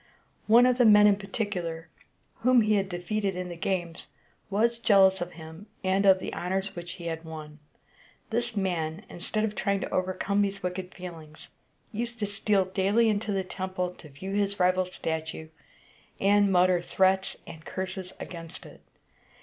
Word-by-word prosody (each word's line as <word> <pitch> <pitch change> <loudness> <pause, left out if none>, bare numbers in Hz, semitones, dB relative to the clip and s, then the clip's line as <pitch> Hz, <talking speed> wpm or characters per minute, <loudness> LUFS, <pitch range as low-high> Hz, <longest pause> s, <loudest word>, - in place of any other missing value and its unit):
One 235 +3 +7
of 250 0 +2
the 245 - +6
men 210 -1 +8
in 205 -1 +6
particular, 195 -5 -4 0.5
whom 250 +1 +4
he 215 0 +2
had 195 -2 +1
defeated 195 +2 -2
in 180 0 -4
the 175 - -6
games, 175 -1 -2 0.4
was 230 +4 +1
jealous 190 -4 +5
of 175 0 -4
him, 160 +5 -11 0.2
and 190 +1 +2
of 190 -1 +7
the 185 - -6
honors 190 +2 -2
which 175 0 -6
he 175 -2 -10
had 165 -1 -4
won. 155 -2 -9 0.7
This 235 0 -1
man, 175 -1 -2
instead 215 +5 -3
of 215 -1 -1
trying 200 0 0
to - - -3
overcome 185 +2 0
these 195 -1 -1
wicked 180 0 -4
feelings, 165 -4 -10 0.4
used 235 +2 -3
to 215 - -1
steal 200 -1 +1
daily 200 +5 +2
into 210 0 -1
the 195 -1 0
temple 185 -1 -3
to 165 -3 -14
view 165 +8 -7
his 200 0 0
rival's 185 0 +2
statue, 160 -1 -4 0.7
and 205 0 +4
mutter 180 -1 +4
threats 190 +2 +1
and 160 -1 -11
curses 190 0 -5
against 165 0 -8
it. - - -14
190 Hz, 165 wpm, -28 LUFS, 175-205 Hz, 0.7 s, men